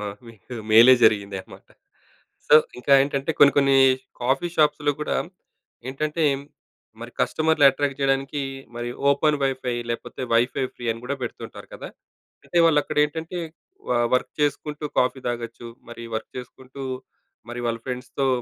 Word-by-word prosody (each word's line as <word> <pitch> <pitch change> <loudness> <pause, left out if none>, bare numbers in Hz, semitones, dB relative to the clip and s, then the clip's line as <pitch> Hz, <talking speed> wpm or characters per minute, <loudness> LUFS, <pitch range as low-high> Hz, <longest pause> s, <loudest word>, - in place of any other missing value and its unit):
ఆ! - - -4 0.2
మీకు 115 +2 -12 0.2
మేలే 115 +4 +8
జరిగింది 100 -2 +2
అన్నమాట. - - -16 0.8
సో, - - +7 0.2
ఇంకా 130 +3 0
ఏంటంటే, 140 +1 -2
కొన్ని 140 - +8
కొన్ని 135 -1 +4 0.5
కాఫీ 135 +7 +1
షాప్స్‌లో 150 -1 +2
కూడా 150 - -1 0.7
ఏంటంటే, 155 +4 -2 0.8
మరి - - -8
కస్టమర్‌‌లు 160 -2 +2
అట్రాక్ట్ 140 0 -2
జేయడానికి 135 +1 0 0.3
మరి 120 0 -4 0.2
ఓపెన్ 150 +1 +2
వైఫై 130 -2 -2 0.2
లేపోతే 115 - -5
వైఫై 125 +3 +2
ఫ్రీ 120 - -10
అని 115 +1 -12
గూడా 140 +3 -3
పెడుతుంటారు 120 - -7
కదా! - - -8 0.6
అంటే 175 - -1
వాళ్ళు 150 -3 +4
అక్కడ - - -7
ఏంటంటే, 160 +4 -5 0.5
వ - - +1 0.2
వర్క్ 125 - 0
చేసుకుంటూ, 150 +1 -2
కాఫీ 130 +1 +1
తాగొచ్చు. 120 0 -5 0.2
మరి 115 0 -9
వర్క్ 110 - -7
చేసుకుంటూ, 130 +2 -10 0.7
మరి 120 0 -5
వాళ్ళ 115 -1 -1
ఫ్రెండ్స్‌తో 125 +2 -3
135 Hz, 140 wpm, -23 LUFS, 120-145 Hz, 0.8 s, మేలే